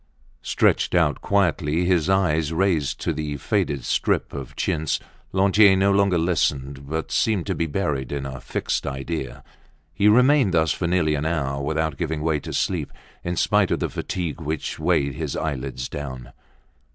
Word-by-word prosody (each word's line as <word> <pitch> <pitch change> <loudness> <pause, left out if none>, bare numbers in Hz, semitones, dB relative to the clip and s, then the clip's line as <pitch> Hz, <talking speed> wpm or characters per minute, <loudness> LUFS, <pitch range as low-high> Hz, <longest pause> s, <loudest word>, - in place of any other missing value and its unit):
Stretched - - +1
out 80 -5 +2
quietly, 90 -4 +1
his 90 -2 +2
eyes 80 -5 +2
raised 80 -6 0
to 85 - 0
the 75 -1 -4
faded 70 0 -1
strip - - 0
of 70 -3 -7
chintz, 80 -1 -1 0.3
Lantier 100 +1 +5
no 100 +1 +3
longer 100 -2 +3
listened, 70 -5 -1
but 80 +1 -3
seemed 105 -6 +1
to - - -1
be 85 - -1
buried 75 -6 -2
in 70 -1 -3
a 65 -1 -6
fixed - - -2
idea. 70 -1 -4 0.5
He 100 +5 +2
remained 125 - +5
thus 80 -1 +3
for 85 - -1
nearly 85 -3 +2
an 75 +1 -1
hour, 70 -4 -1
without 80 0 -1
giving 80 -2 -2
way 80 -2 +1
to - - -8
sleep, - - -1 0.3
in 90 +1 -2
spite - - +2
of - - 0
the - - -1
fatigue 85 -4 -4
which 80 0 -4
weighed 75 -4 +1
his - - -4
eyelids 65 -4 -3
down. 65 -4 -7
80 Hz, 165 wpm, -23 LUFS, 70-90 Hz, 0.5 s, Lantier